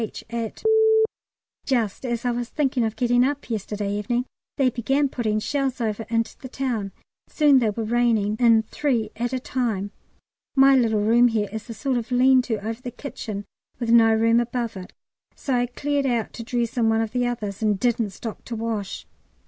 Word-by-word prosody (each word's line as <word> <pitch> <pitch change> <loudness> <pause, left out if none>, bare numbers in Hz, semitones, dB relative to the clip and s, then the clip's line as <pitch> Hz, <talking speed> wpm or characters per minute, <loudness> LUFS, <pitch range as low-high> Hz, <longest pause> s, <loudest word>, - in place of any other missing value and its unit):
H., 220 - -5
at. 230 -2 -4 1.0
Just 235 -3 -1
as 235 0 -3
I 245 - +2
was 240 0 -3
thinking 270 -5 0
of 220 -1 -1
getting 245 0 +3
up 280 -1 -2
yesterday 205 -1 -3
evening 235 +4 -1 0.3
they 265 -2 +3
began 270 +4 +1
putting 220 -5 -1
shells 270 +2 -1
over 220 -1 -2
into 230 0 -1
the 260 - -9
town, 255 -4 -2
and 195 - -9 0.4
soon 290 -3 +4
they 230 -3 +2
were 225 +2 -3
raining 220 -2 +1
in 230 -2 +5
three 230 -3 -1
at 240 +1 -2
a 260 - -1
time. 225 -6 -2 0.6
My 270 0 +6
little 225 -5 +2
room 235 +3 +5
here 215 -3 -1
is 220 +1 -7
a 230 - -6
sort 270 -1 -1
of 230 - -8
lean 255 +1 +5
to 220 -4 -3
over 225 +2 -4
the 250 - -5
kitchen 215 -6 -6 0.3
with 235 -2 -1
no 225 -1 +6
room 230 +1 +3
above 240 -1 -2
it; 185 -1 -9 0.4
so 270 - -3
I 245 0 +2
cleared 285 +2 -1
out 235 -3 -1
to 230 - -7
dress 235 0 -2
in 225 -2 +3
one 225 0 +2
of 225 -1 -2
the 245 0 0
others, 215 -5 -4
and 210 -3 +1
didn't 235 -2 +1
stop 215 +3 -8
to 235 - -5
wash. 220 -3 -4
235 Hz, 195 wpm, -24 LUFS, 220-250 Hz, 1.0 s, My